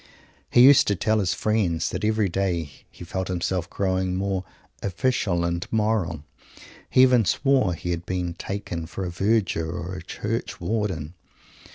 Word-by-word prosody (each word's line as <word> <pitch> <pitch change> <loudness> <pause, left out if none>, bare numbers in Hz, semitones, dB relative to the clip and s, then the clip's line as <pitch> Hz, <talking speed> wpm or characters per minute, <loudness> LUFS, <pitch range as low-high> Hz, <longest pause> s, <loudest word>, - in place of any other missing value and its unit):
He 120 - +5
used 140 +1 +7
to 100 - +2
tell 110 +5 +1
his 95 -2 0
friends 105 -7 0
that 90 +3 -4
every 110 -1 +2
day 85 -5 -1 0.2
he - - -12
felt 95 +2 -3
himself 90 0 -2
growing 95 -1 -1
more 95 0 -1 0.4
"official" 95 -3 0
and 85 0 -1
"moral." 105 -8 0 0.7
He 130 - +6
even 125 -3 +5
swore 130 - +2
he 90 +2 -4
had 85 0 -4
been 90 -2 -2
taken 90 -3 -5
for 95 +3 -5
a 90 - -4
Verger 95 -3 +1
or 90 +2 -5
a 95 - -6
Church 115 +3 -4
warden. 90 -5 -2
95 Hz, 160 wpm, -24 LUFS, 85-105 Hz, 0.7 s, used